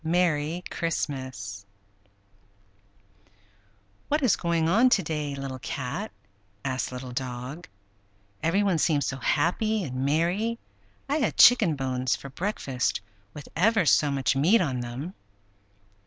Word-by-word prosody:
MERRY 165 0 +1
CHRISTMAS 130 -11 -3 2.4
"What 300 0 0
is 240 -8 +4
going 170 -2 0
on 230 +9 +5
to 220 -6 +3
day, 150 -2 -3
Little 135 -1 -5
Cat?" 140 - -4 0.5
asked 130 -1 -2
Little 125 0 -7
Dog. 125 +5 -5 0.7
"Every 170 +6 +2
one 190 -5 +2
seems 150 -3 +2
so 135 - -3
happy 200 - +1
and 130 -4 -3
merry. 175 +11 +1 0.5
I 285 +2 +1
had 290 - 0
chicken 215 -10 +7
bones 130 -2 -1
for 140 - -10
breakfast, 135 - -2 0.4
with 150 - -9
ever 205 +2 +3
so 150 0 +4
much 135 -1 +1
meat 170 +12 +4
on 135 -9 -1
them!" 125 +9 -5
150 Hz, 125 wpm, -26 LUFS, 130-185 Hz, 2.4 s, chicken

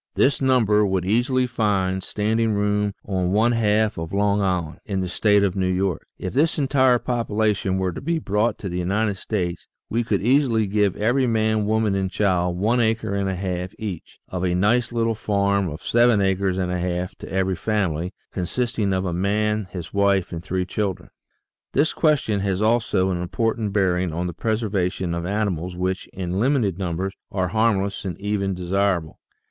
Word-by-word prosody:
This 135 -2 +2
number 115 -6 +3
would 95 -3 0
easily 125 +5 +2
find 100 -6 0
standing 110 +3 0
room 105 0 0
on 95 -2 -1
one 110 +3 +3
half 110 -3 +1
of 80 0 -5
Long 100 +1 +2
Island, 90 -5 -1
in 95 -2 -2
the 90 - -2
State 105 +3 +3
of 95 -3 0
New 95 -1 +1
York. 95 -2 -1
If 95 - -5
this 150 +5 +2
entire 130 -3 +3
population 110 -5 0
were 95 -1 0
to - - -7
be 165 +4 0
brought 105 -5 0
to 100 - -6
the 90 0 -3
United 100 +3 0
States, 90 -4 -3 0.2
we 120 +2 +1
could 105 -4 -1
easily 120 -3 +3
give 100 -1 +1
every 125 +5 +2
man, 110 -2 +1
woman, 110 -1 +1
and 95 -1 0
child, 90 -3 +1
one 115 +6 +2
acre 110 -2 0
and 100 -1 0
a 95 - -2
half 90 0 -4
each, 100 -7 -6
or 90 -1 -3
a 90 - 0
nice 115 +7 +2
little 115 -1 +1
farm 100 -3 0
of 75 +1 -8
seven 120 -2 +4
acres 95 -1 +1
and 90 -1 -1
a 90 - -1
half 90 0 -2
to - - -9
every 95 0 0
family, 90 -4 -1 0.2
consisting 105 +2 -1
of 95 0 0
a 90 - -2
man, 105 +3 0
his 85 -3 -7
wife, 100 -2 +2
and 85 -2 -5
three 90 +1 -2
children. 95 0 -3 0.6
This 145 +4 +2
question 145 -10 +2
has 95 -1 -1
also 110 -4 +2
an 90 -1 -2
important 110 +3 -1
bearing 95 -3 +1
on 85 +3 -2
the 90 - -3
preservation 95 -4 -1
of 85 0 -3
animals 90 -4 -2
which, 95 +1 -2
in 90 0 -3
limited 115 - +1
numbers, 95 +1 -2 0.2
are 95 -2 -1
harm 110 -1 +2
less 100 0 -5
and 95 -3 -5
even 100 -1 -1
desirable. 90 -2 -1
100 Hz, 185 wpm, -23 LUFS, 90-110 Hz, 0.6 s, seven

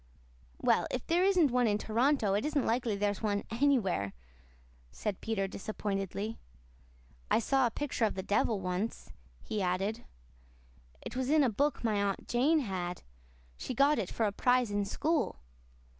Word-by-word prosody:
"Well, - - +2
if 255 - -3
there 345 +2 +2
isn't 365 -8 +4
one 245 -1 +3
in 205 -1 +2
Toronto 225 0 +1
it 205 - +1
isn't 295 -3 0
likely 230 -2 0
there's 205 -1 -1
one 205 -2 0
anywhere," 230 - +1 0.8
said 200 - -4
Peter 205 -3 -1
disappointedly. 200 +1 -4 0.9
"I - - +4
saw 260 +3 +2
a - - -1
picture 265 -2 -1
of 215 - -1
the 190 - -4
devil 205 +1 +1
once," 185 +4 -3 0.3
he 215 - -3
added. 195 +5 -1 1.0
"It - - -7
was 260 0 -1
in 305 0 +5
a 250 - +2
book 285 +7 0
my 215 -3 +1
Aunt 200 -1 -2
Jane 295 +6 +3
had. 180 -6 -4 0.5
She 255 - -5
got 280 +3 +4
it 195 - -2
for 225 - 0
a 205 - +1
prize 245 +1 +2
in 205 0 0
school. 310 +8 0
225 Hz, 160 wpm, -31 LUFS, 200-260 Hz, 1.0 s, in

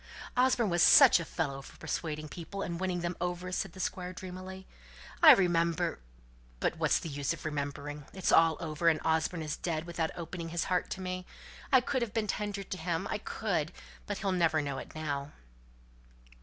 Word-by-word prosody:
"Osborne 250 -4 +3
was 175 0 +2
such - - +8
a - - -3
fellow 140 -5 -3
for - - -14
persuading 155 -2 -4
people, 175 +5 -6
and 170 0 -4
winning 185 -2 -1
them 175 +1 -2
over," 180 +1 -3
said 185 -1 -2
the 190 - -12
Squire, 180 0 -3
dreamily. 185 +1 -8 0.6
"I - - +11
remember 170 - +1 0.6
but - - 0
what's - - +3
the - - -5
use 145 0 -1
of 165 - -10
remembering? 145 -1 -4
It's 190 -1 -1
all 165 -1 +5
over, 165 0 +1
and 155 -1 +2
Osborne's 160 -1 0
dead 165 -2 -3
without 170 -2 -2
opening 170 0 -6
his 170 0 -1
heart 180 -1 0
to 190 - -5
me. 185 0 -4 0.4
I 260 -2 +7
could 260 +1 -1
have 230 -3 -3
been 220 -1 +1
tender 205 -1 -3
to 190 - -6
him, 165 0 -2
I - - -1
could. - - -2 0.4
But - - -2
he'll 195 -1 -1
never 165 -3 +2
know 140 -2 -3
it - - -10
now!" 145 -2 -3
170 Hz, 185 wpm, -31 LUFS, 155-185 Hz, 0.6 s, I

